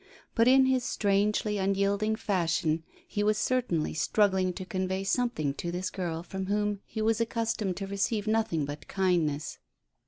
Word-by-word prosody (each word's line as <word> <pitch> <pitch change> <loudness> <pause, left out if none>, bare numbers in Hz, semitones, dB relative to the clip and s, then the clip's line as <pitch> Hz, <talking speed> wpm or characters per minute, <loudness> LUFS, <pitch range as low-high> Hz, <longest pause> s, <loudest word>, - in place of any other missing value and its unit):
But 230 0 +3
in 265 +1 +7
his 260 -1 +2
strangely 210 0 +1
unyielding 200 +2 +1
fashion 170 -6 0 0.3
he 205 - -2
was 210 +1 +2
certainly 225 -10 0
struggling 190 +2 +2
to 185 - -6
convey 190 +1 -2
something 195 - 0
to 170 +4 -4
this 180 +1 -3
girl 170 -3 -3
from 190 +2 -5
whom 205 0 0
he 220 - -3
was 225 +1 +2
accustomed 225 -5 -1
to 195 - -3
receive 200 +2 -1
nothing 215 -9 +1
but 145 +1 -7
kindness. 170 -6 0
195 Hz, 155 wpm, -29 LUFS, 180-215 Hz, 0.3 s, in